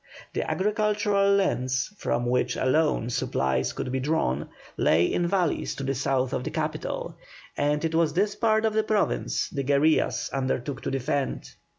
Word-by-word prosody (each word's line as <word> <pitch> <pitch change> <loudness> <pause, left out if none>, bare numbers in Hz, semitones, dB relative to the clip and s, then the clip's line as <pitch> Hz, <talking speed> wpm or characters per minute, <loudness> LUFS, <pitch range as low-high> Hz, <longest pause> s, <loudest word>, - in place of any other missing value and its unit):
The - - -2
agricultural 205 -1 +2
lands, 130 -4 0
from 120 -10 -1
which 125 +1 +1
alone 130 -3 +1
supplies 65 - 0
could 125 - -4
be 130 - -1
drawn, 130 - 0 0.3
lay 85 +2 +3
in 175 - 0
valleys 180 -3 0
to 140 - -5
the 135 0 0
south 130 -1 0
of 125 - -1
the - - -3
capital, - - -3 0.4
and 150 +2 0
it 165 - -1
was 160 -2 +2
this 200 +4 +1
part 220 -1 +2
of 220 - +1
the 220 - +3
Province 215 -1 0
the 140 - -3
guerillas 140 +3 +2
undertook 135 0 -2
to - - -3
defend. 135 +1 -2
150 Hz, 165 wpm, -26 LUFS, 130-200 Hz, 0.4 s, lay